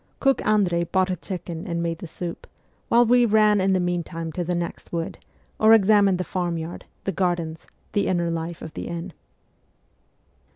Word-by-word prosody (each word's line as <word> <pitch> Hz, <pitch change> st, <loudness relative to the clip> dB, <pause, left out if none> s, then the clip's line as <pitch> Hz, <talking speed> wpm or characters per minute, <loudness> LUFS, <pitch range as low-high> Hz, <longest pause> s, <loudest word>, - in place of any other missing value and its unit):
Cook 270 Hz, -1 st, +2 dB
Andrei 185 Hz, -5 st, +2 dB
bought 185 Hz, +2 st, +1 dB
a^ 180 Hz, -3 st, -3 dB
chicken 175 Hz, -1 st, -6 dB
and 170 Hz, -1 st, -2 dB
made 165 Hz, -1 st, -2 dB
the 175 Hz, -, -7 dB
soup, 170 Hz, +1 st, -7 dB, 0.4 s
while 240 Hz, +1 st, +5 dB
we 245 Hz, +1 st, +5 dB
ran 215 Hz, -2 st, +4 dB
in 190 Hz, 0 st, +2 dB
the 185 Hz, -, +2 dB
meantime 170 Hz, -2 st, -2 dB
to 175 Hz, -, -3 dB
the 175 Hz, +1 st, -1 dB
next 170 Hz, 0 st, -5 dB
wood, 165 Hz, -1 st, -3 dB, 0.4 s
or 220 Hz, +1 st, +7 dB
examined 200 Hz, -2 st, +4 dB
the 185 Hz, -, -2 dB
farm 175 Hz, -1 st, -2 dB
yard, 165 Hz, +1 st, -6 dB, 0.2 s
the 195 Hz, -, -1 dB
gardens, 175 Hz, -4 st, -2 dB, 0.3 s
the 200 Hz, -, +1 dB
inner 175 Hz, -2 st, +1 dB
life 165 Hz, 0 st, -4 dB
of 160 Hz, -, -8 dB
the -, -, -5 dB
inn. 170 Hz, +1 st, -5 dB
175 Hz, 180 wpm, -24 LUFS, 170-200 Hz, 0.4 s, or